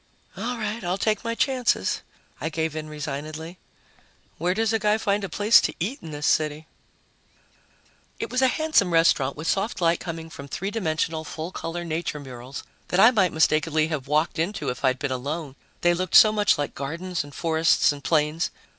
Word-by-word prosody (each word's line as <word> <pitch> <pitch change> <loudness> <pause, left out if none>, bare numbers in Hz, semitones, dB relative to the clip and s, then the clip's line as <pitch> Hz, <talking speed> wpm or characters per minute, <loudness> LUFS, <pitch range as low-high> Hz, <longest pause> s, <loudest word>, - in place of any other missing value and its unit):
"All 245 +2 -3
right, 215 0 -3
I'll 175 +2 -1
take 215 0 0
my 230 0 -2
chances," 250 - +1 0.4
I 155 - -1
gave 160 -1 -2
in 155 -1 -5
resignedly. 155 +3 -6 0.8
"Where 175 +3 +1
does 225 +1 +1
a 225 - +2
guy 210 0 +2
find 205 -1 0
a 195 - -3
place 210 +7 +5
to - - -2
eat 225 - -2
in 160 - -9
this 150 -1 -4
city?" 155 0 +1 1.5
It 230 - -4
was 255 +1 +1
a 260 - +5
handsome 285 - +2
restaurant 150 -5 +3
with 155 - -6
soft 200 +6 0
light 170 -1 +2
coming 165 -1 -6
from 140 - -9
three 195 +8 -4
dimensional, 160 -6 -1
full 160 +3 -6
color 175 -1 -5
nature 160 -2 -3
murals 130 0 -8 0.2
that 180 - 0
I 225 +5 +8
might 190 -8 +2
mistakenly 155 0 +2
have 145 -5 -3
walked 155 +3 +1
into 185 +6 -1
if 125 +2 -5
I'd 130 -1 +3
been 140 0 -3
alone, 140 +2 -4 0.3
they 175 0 +4
looked 185 +2 -2
so 215 - +9
much 210 -2 +3
like 145 - -3
gardens 170 +5 -4
and 145 -1 -13
forests 165 -1 +3
and 145 -1 -8
plains. 155 0 +1
165 Hz, 190 wpm, -25 LUFS, 150-200 Hz, 1.5 s, so